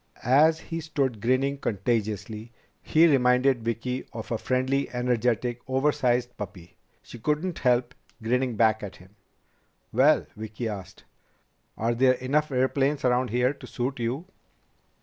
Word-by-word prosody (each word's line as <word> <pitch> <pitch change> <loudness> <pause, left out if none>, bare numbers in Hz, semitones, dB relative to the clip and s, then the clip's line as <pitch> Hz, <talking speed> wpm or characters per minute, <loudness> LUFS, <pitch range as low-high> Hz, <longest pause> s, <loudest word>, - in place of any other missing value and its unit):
As 150 +6 +4
he 165 0 -5
stood 140 -8 -2
grinning 135 +4 +1
contagiously, 110 0 -2 0.3
he 160 +2 +4
reminded 125 -3 +3
Vicki 115 +3 -3
of 110 +1 -7
a 115 - +1
friendly, 130 +2 0
energetic, 125 -1 0
oversized 130 -3 +1
puppy. 90 -4 -9 0.3
She 120 - -11
couldn't 150 +8 -1
help 125 -1 +2 0.3
grinning 125 +1 0
back 110 0 +3
at 105 -2 -7
him. 95 +2 -18 0.8
"Well," 140 +6 +4
Vicki 110 +2 -5
asked, 100 -4 -7 0.7
"are 115 +2 0
there 130 +2 +4
enough 145 +4 0
airplanes 135 +2 +1
around 125 0 +2
here 125 +4 +1
to - - -12
suit 130 +1 -3
you?" 125 +8 -2
125 Hz, 130 wpm, -26 LUFS, 115-135 Hz, 0.8 s, As